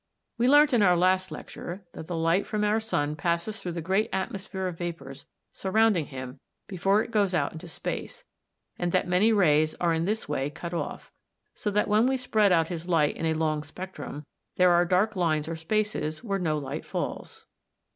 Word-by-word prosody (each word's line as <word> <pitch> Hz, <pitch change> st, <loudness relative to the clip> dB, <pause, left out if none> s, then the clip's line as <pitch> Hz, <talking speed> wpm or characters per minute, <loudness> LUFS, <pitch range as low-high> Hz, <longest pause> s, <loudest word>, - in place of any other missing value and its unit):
We 240 Hz, -, +3 dB
learnt 290 Hz, +1 st, +6 dB
in 235 Hz, -, +4 dB
our 180 Hz, -3 st, +5 dB
last 185 Hz, +1 st, +2 dB
lecture 185 Hz, +3 st, -8 dB
(p. -, -, -10 dB
131) -, -, -3 dB
that 160 Hz, -, -10 dB
the 175 Hz, -, -3 dB
light 165 Hz, +4 st, +1 dB
from 210 Hz, -1 st, -1 dB
our 210 Hz, +1 st, +2 dB
sun 150 Hz, -9 st, -1 dB
passes 170 Hz, +7 st, -2 dB
through 175 Hz, -, -4 dB
the 170 Hz, -1 st, -4 dB
great 190 Hz, +5 st, +1 dB
atmosphere 190 Hz, 0 st, -3 dB
of 180 Hz, -3 st, -4 dB
vapours 140 Hz, -6 st, -6 dB, 0.2 s
surrounding 195 Hz, -4 st, +2 dB
him 130 Hz, -1 st, -8 dB, 0.3 s
before 195 Hz, +3 st, +2 dB
it -, -, -10 dB
goes 200 Hz, -4 st, +2 dB
out -, -, +1 dB
into 160 Hz, +2 st, -9 dB
space, 165 Hz, -, -5 dB, 0.6 s
and 175 Hz, 0 st, 0 dB
that -, -, +2 dB
many 185 Hz, +5 st, +4 dB
rays 155 Hz, -7 st, +3 dB
are 170 Hz, -1 st, +1 dB
in 165 Hz, +1 st, 0 dB
this 215 Hz, +3 st, -2 dB
way 135 Hz, +2 st, -1 dB
cut 170 Hz, +4 st, -7 dB
off; 170 Hz, -, -5 dB, 0.4 s
so 210 Hz, -, -3 dB
that 210 Hz, +1 st, +1 dB
when 215 Hz, +3 st, +4 dB
we 265 Hz, 0 st, +1 dB
spread 215 Hz, -5 st, +2 dB
out 165 Hz, -2 st, +3 dB
his 175 Hz, 0 st, -5 dB
light 155 Hz, -4 st, +3 dB
in 165 Hz, -, -2 dB
a 160 Hz, -, +1 dB
long 155 Hz, -1 st, 0 dB
spectrum 150 Hz, -2 st, -8 dB, 0.3 s
there 180 Hz, -1 st, +5 dB
are 175 Hz, 0 st, +4 dB
dark 190 Hz, +5 st, +2 dB
lines 160 Hz, -4 st, +1 dB
or 165 Hz, -, -3 dB
spaces 160 Hz, -2 st, -2 dB
where 200 Hz, -4 st, -1 dB
no 155 Hz, -4 st, 0 dB
light 140 Hz, -2 st, -5 dB
falls. -, -, -5 dB
180 Hz, 205 wpm, -27 LUFS, 160-205 Hz, 0.6 s, learnt